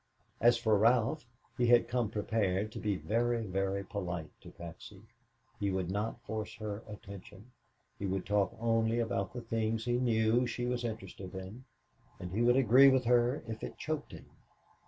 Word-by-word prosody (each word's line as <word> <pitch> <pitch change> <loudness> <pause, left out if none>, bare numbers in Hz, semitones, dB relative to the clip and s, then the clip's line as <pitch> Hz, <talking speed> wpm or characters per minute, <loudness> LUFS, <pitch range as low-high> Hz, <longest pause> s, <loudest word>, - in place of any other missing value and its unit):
As 120 +1 +5
for 110 -3 +2
Ralph, 120 +5 +2 0.3
he 120 - +3
had 120 0 +5
come 120 -3 0
prepared 105 -1 0
to - - -7
be 105 -2 0
very, 115 +4 0
very 95 0 -1
polite 90 -7 -5
to - - -11
Patsy. 90 +4 -11 0.6
He 100 -2 0
would 95 -2 -1
not 110 +4 -3
force 110 -4 -5
her 105 -1 -5
attention, 105 +1 -11 0.5
he 100 - -2
would 95 0 -2
talk 100 -2 +1
only 115 0 +1
about 110 -4 -1
the 120 - -6
things 115 -1 -1
he 120 0 +1
knew 115 0 +2
she 120 +1 -3
was 125 0 -1
interested 95 -4 -6
in 95 +7 -8 0.5
and 90 - -6
he 105 +5 -1
would 120 +2 +4
agree 135 +2 +7
with 130 -2 +2
her 120 +3 +3
if 110 0 -6
it - - -6
choked 155 -1 -4
him. - - -10
110 Hz, 175 wpm, -32 LUFS, 100-120 Hz, 0.6 s, agree